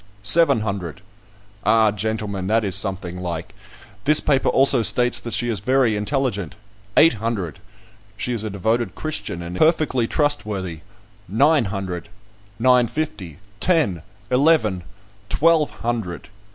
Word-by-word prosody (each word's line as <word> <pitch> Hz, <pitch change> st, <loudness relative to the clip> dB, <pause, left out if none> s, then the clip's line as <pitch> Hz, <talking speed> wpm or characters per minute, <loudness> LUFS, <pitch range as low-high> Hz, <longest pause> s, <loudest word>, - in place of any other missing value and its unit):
"Seven 140 Hz, +2 st, +5 dB
hundred." 95 Hz, -4 st, -5 dB, 0.6 s
"Ah; 110 Hz, 0 st, +4 dB
gentlemen, 105 Hz, -2 st, -3 dB
that 110 Hz, +2 st, +2 dB
is 95 Hz, -2 st, -1 dB
something 95 Hz, -3 st, -4 dB
like. 85 Hz, -2 st, -5 dB, 0.5 s
This 150 Hz, +2 st, +7 dB
paper 140 Hz, -2 st, +1 dB
also 135 Hz, -2 st, +4 dB
states 120 Hz, +1 st, +2 dB
that 120 Hz, -1 st, -3 dB
she 120 Hz, -, 0 dB
is 115 Hz, -4 st, -1 dB
very 125 Hz, +1 st, +2 dB
intelligent." 105 Hz, -, -2 dB, 0.4 s
"Eight 165 Hz, -, +6 dB
hundred." 100 Hz, -8 st, -3 dB, 0.6 s
"She 125 Hz, -, -3 dB
is 110 Hz, -3 st, -1 dB
a 110 Hz, -, -3 dB
devoted 110 Hz, +4 st, -1 dB
Christian, 155 Hz, -, -4 dB
and 85 Hz, +1 st, -7 dB
perfectly 155 Hz, -, +2 dB
trustworthy." 105 Hz, -, -2 dB, 0.5 s
"Nine 140 Hz, -, +3 dB
hundred." 95 Hz, -1 st, -5 dB, 0.5 s
"Nine 125 Hz, +1 st, +4 dB
fifty." 100 Hz, -, -5 dB, 0.2 s
"Ten." 155 Hz, -, +1 dB, 0.3 s
"Eleven." 125 Hz, -, +2 dB, 0.5 s
"Twelve 165 Hz, -1 st, +3 dB
hundred." 115 Hz, -7 st, -5 dB
110 Hz, 125 wpm, -21 LUFS, 95-135 Hz, 0.6 s, This